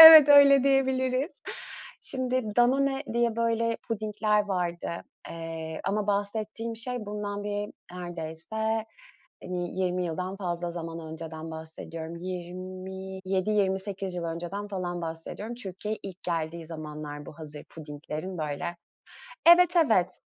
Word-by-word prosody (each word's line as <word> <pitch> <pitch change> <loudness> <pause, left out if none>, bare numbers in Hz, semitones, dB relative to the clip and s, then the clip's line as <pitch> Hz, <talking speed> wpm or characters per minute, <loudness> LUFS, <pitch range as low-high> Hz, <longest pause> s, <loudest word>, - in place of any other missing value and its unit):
evet, 320 -3 +14
öyle 280 -2 +9
diyebiliriz. 265 +1 +2 0.6
Şimdi, 255 -4 -1
Danone 270 +3 +4
diye, 235 -1 +2
böyle, 230 0 +2
pudingler 210 -1 +1
vardı. 180 -3 -1 0.4
Eee, 165 -1 -5
ama 205 +1 0
bahsettiğim 215 +3 -1
şey 240 -1 0
bundan 205 0 -3
bir 205 0 -2 0.2
neredeyse, 180 +6 -2 0.6
hani, 180 0 -3
20 180 0 +1
yıldan 180 +3 -3
fazla 175 -2 -2
zaman 165 -1 -5
önceden 160 0 -6
bahsediyorum. 160 +1 -6
27-28 190 +2 -2
yıl 175 -1 -3
önceden 175 +5 -4
falan 175 -3 -3
bahsediyorum. 165 +7 -5
Türkiye'ye 210 -1 -4
ilk 185 -1 -8
geldiği 165 -1 -2
zamanlar 150 -2 -6
bu 150 - -10
hazır 150 -2 -8
pudinglerin, 155 +3 -6
böyle. 155 +3 -2 0.7
Evet, 350 +1 +8
evet. 220 - +4
190 Hz, 110 wpm, -28 LUFS, 170-220 Hz, 0.7 s, evet